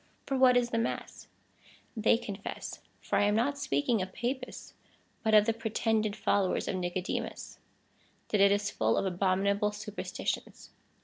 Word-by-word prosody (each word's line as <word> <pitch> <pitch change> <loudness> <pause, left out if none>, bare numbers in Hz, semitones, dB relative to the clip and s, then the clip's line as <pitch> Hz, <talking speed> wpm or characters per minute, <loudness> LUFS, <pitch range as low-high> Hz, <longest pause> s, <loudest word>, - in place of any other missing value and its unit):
For 275 - -1
what 255 -1 +6
is 240 -1 +1
the 230 - +1
mass? 230 - -4 0.7
They 225 0 +4
confess 200 -3 -6 0.2
(for - - 0
I - - +4
am 205 0 +2
not 280 +6 +1
speaking 190 - +1
of 185 0 -4
Papists, 255 +4 -4 0.5
but 220 -1 +3
of 210 -1 +7
the 225 - +2
pretended 220 -1 0
followers 195 -3 +1
of 185 - -1
Ni 180 -1 -1
codemus) 180 +1 -4 0.7
that 210 - +2
it 200 0 +6
is 205 0 +1
full 110 0 +1
of - - +1
abominable 195 +2 +1
superstitions. 210 0 -5
210 Hz, 160 wpm, -30 LUFS, 195-230 Hz, 0.7 s, of